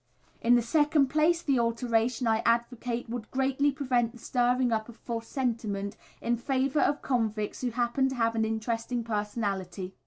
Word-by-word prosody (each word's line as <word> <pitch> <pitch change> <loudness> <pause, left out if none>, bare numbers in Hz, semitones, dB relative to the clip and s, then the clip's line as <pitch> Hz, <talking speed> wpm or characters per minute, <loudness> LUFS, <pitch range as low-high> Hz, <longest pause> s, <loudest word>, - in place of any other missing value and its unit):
In 240 +1 +5
the 240 - +3
second 295 +2 +3
place, 315 +4 +2
the 275 -4 +2
alteration 230 +1 +1
I 220 -1 +3
advocate 235 +1 0
would 230 -1 -5
greatly 270 +2 +1
prevent 250 -4 0
the - - -12
stirring 245 +1 +1
up 220 0 -1
of 235 - -11
false 230 -1 -5
sentiment 220 -6 -2 0.3
in 235 0 0
favour 270 +3 0
of 290 - +1
convicts 220 -5 -1
who 250 - 0
happen 240 +3 +1
to 265 - -4
have 230 -2 +1
an 225 -1 +1
interesting 230 +2 -2
personality. 205 -4 -3
235 Hz, 165 wpm, -29 LUFS, 225-260 Hz, 0.3 s, In